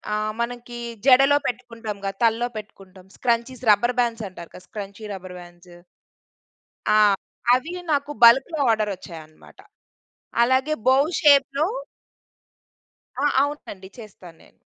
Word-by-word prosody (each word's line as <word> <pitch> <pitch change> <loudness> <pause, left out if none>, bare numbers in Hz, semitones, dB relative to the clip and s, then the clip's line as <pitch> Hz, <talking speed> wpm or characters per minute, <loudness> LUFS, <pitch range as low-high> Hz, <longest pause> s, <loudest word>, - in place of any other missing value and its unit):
ఆహ్, 215 0 -2
మనకి 240 0 -5 0.3
జడలో 275 +2 +6
పెట్టుకుంటాంగా 225 -5 -5
తల్లో 230 +1 +2
పెట్టుకుంటాం 195 -3 -12
స్క్రంచీస్ 240 +1 -2
రబ్బర్ 240 +4 +2
బాండ్స్ 230 -2 0
అంటారు 170 -2 -12
కదా 180 - -13
స్క్రంచీ 205 0 -8
రబ్బర్ 185 -1 -9
బాండ్సు. 175 0 -16 1.1
ఆ! 215 - +4 0.6
అవి 260 +7 0 0.2
నాకు 285 0 0
బల్క్‌లో 265 +8 +6
ఆర్డర్ 215 -2 0
వచ్చాయన్నమాట. 160 -4 -14 0.8
అలాగే 260 +5 +1
బోవ్ 275 +4 +4
షేప్‌లో 285 0 +4 1.5
ఆ! 285 - +1 0.2
అవునండి. 245 -10 -6
చేస్తా 210 -5 -13
నేను. - - -21
230 Hz, 110 wpm, -23 LUFS, 195-260 Hz, 1.5 s, జడలో